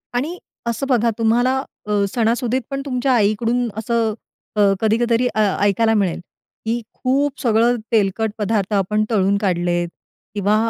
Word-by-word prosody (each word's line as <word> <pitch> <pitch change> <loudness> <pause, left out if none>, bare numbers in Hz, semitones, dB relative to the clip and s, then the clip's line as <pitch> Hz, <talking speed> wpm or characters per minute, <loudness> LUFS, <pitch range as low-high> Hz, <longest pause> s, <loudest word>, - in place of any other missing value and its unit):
आणि 310 +9 -1 0.3
असं 235 +4 -1
बघा, 235 -3 +3
तुम्हाला 240 +3 +2 0.3
अ, 210 - -4 0.2
सणासुदीत 240 +2 +1
पण 275 0 -3
तुमच्या 260 0 0
आईकडून 230 +2 +1
असं, 225 0 0 0.4
अ, 210 - +2 0.2
कधी 220 0 +2
क 240 0 0
तरी 235 +2 +3
अ, 215 - +1 0.2
ऐकायला 220 +3 +3
मिळेल, 195 -5 +1 0.5
की 235 +2 -1
खूप 275 +2 0
सगळं 235 0 +3 0.2
तेलकट 215 0 +1
पदार्थ 210 -1 -1
आपण 210 +2 +1
तळून 200 -1 +2
काढलेत 175 -3 0 0.5
किंवा 205 +1 +2
225 Hz, 145 wpm, -20 LUFS, 210-245 Hz, 0.5 s, बघा